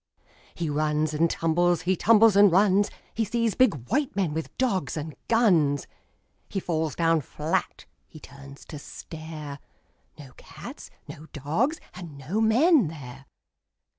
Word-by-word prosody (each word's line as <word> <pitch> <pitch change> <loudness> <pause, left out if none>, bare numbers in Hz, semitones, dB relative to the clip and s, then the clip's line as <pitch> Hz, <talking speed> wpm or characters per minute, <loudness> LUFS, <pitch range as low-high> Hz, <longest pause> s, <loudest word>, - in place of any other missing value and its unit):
He 170 - -3
runs 150 +1 0
and 165 +2 +2
tumbles, 175 +2 +1
he 185 +2 +1
tumbles 220 +2 +5
and 200 -1 +7
runs. 200 +2 +4 0.2
He 225 - 0
sees 230 0 0
big 255 - +3
white 290 +1 0
men 185 -6 0
with 160 +1 -5
dogs 195 - -1
and 155 0 -5
guns. 170 -12 +3 0.6
He 195 - -2
falls 160 -4 -2
down 165 -1 +2
flat. 150 +4 -3 0.2
H)e 155 - -13
turns 140 0 -13
to 150 - -9
stare 155 -2 -9 0.3
— - - -41
No 135 -4 -12
cats, - - -11 0.2
no 155 +2 -10
dogs, 165 - -1
and 170 -6 -10
no 160 +11 -2
men 250 - +4
there. 135 -3 -10
165 Hz, 145 wpm, -26 LUFS, 150-205 Hz, 0.6 s, and